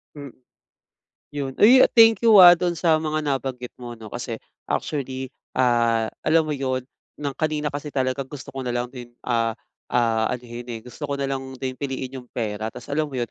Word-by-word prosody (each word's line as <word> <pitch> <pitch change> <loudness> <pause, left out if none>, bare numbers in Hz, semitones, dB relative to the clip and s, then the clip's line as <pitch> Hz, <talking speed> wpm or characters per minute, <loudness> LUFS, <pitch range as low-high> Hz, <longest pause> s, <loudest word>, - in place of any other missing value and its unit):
Hmm, 140 -2 -8 1.0
'yon. 140 -2 -3
Uy, 250 +5 +8
thank 225 0 +7
you, 225 -2 +7
ah, 175 -1 +11
do'n 175 0 -1
sa 165 -1 +3
mga 155 -1 -2
nabanggit 130 -3 -3
mo, 120 -1 -7
'no. 110 - -10
Kasi 120 -2 -5 0.3
actually, 130 -3 -3 0.2
ah, 115 -3 +3 0.2
alam 160 0 +3
mo 150 - -1
'yon, 130 -2 -2 0.3
ng 140 -2 -3
kanina 155 -1 -1
kasi 145 +1 -5
talaga 130 0 0
gusto 135 +1 -10
ko 135 - -4
na 125 - -2
lang 120 0 -1
din, 120 -2 -9 0.2
ah 115 -2 +1 0.4
ah, 115 -2 +2
anohin, 120 0 -7
eh. 115 - -6
Gusto 125 +5 -9
ko 140 -1 -3
na 135 - -1
lang 135 -1 -2 0.2
din 130 -1 -3
piliin 135 -1 -4
'yong 125 - -20
pera 110 -2 -3
tapos - - -10
alam 150 +1 -1
mo - - -10
'yon, 120 -1 -2
135 Hz, 195 wpm, -23 LUFS, 120-150 Hz, 1.0 s, ah